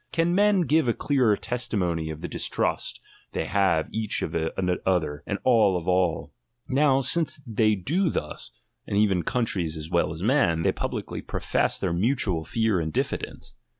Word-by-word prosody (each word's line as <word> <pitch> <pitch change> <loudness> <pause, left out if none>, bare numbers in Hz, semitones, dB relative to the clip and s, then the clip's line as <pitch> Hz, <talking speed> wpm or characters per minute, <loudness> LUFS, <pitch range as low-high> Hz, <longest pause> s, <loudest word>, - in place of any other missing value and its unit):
Can 170 +1 +1
men 205 0 +4
give 155 -2 +2
a 120 - +2
clearer 125 -8 +2
testimony 95 -9 -2
of 80 0 -7
the - - -4
distrust - - -2 0.3
they - - -2
have 95 -4 +2
each 110 -1 -1
of - - -4 0.5
other, 80 -6 0
and 100 - -1
all 110 -7 +4
of 85 - -6
all 90 -2 +1 0.3
r - - -5
Now, 135 -1 +4
since 155 +4 +2
they 110 -2 +2
do 165 - 0
thus, 75 - -4 0.4
and 100 - -1
even 100 -4 +3
countries 90 -6 -1
as 80 +2 -8
well 85 -2 +2
as 80 +2 -6
meUj 95 - +2
they - - +3
pubhcly - - -5
profess - - 0
their 90 -3 -1
mutual 95 - +1
fear 110 +1 0
and 80 -1 -2
diffidence. - - -4
105 Hz, 170 wpm, -25 LUFS, 85-130 Hz, 0.5 s, men